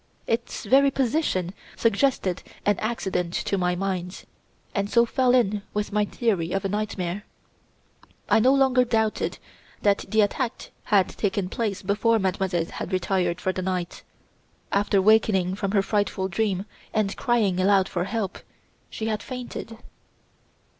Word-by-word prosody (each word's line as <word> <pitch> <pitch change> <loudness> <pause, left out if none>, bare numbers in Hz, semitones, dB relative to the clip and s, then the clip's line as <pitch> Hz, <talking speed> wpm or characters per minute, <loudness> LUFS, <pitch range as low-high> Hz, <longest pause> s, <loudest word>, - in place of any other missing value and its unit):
Its 230 +1 -2
very 275 +2 +5
position 250 - 0 0.2
suggested 225 -4 +1 0.2
an 205 - +4
accident 190 -6 -2
to - - -1
my 180 -2 +1
mind, 185 -1 -3 0.5
and 200 -1 -1
so 235 +1 +4
fell 250 +1 +2
in 210 -4 +2
with 210 0 -1
my 210 0 +2
theory 195 -7 -1
of 195 0 -1
a - - 0
nightmare. 205 -2 -3 1.0
I - - +4
no 250 +4 +5
longer 265 -2 +4
doubted 220 -3 0 0.5
that 200 -1 +2
the 220 +1 +4
attack 230 +4 -2
had 200 -3 +3
taken 195 -2 -2
place 205 -3 -2
before 210 +4 +2
Mademoiselle 190 -3 0
had 175 - -6
retired 180 -1 0
for 185 - -1
the 185 - -3
night. 180 -2 -3 0.7
After 200 0 +2
wakening 195 -3 +3
from 195 0 -2
her 200 -2 +3
frightful 195 -2 0
dream 195 0 -1 0.3
and 205 -2 +1
crying 215 -7 +1
aloud 190 0 +4
for 175 0 -2
help, 200 -2 -3 0.5
she 220 - -5
had 215 -1 -1
fainted. 245 -3 -7
200 Hz, 145 wpm, -25 LUFS, 185-225 Hz, 1.0 s, very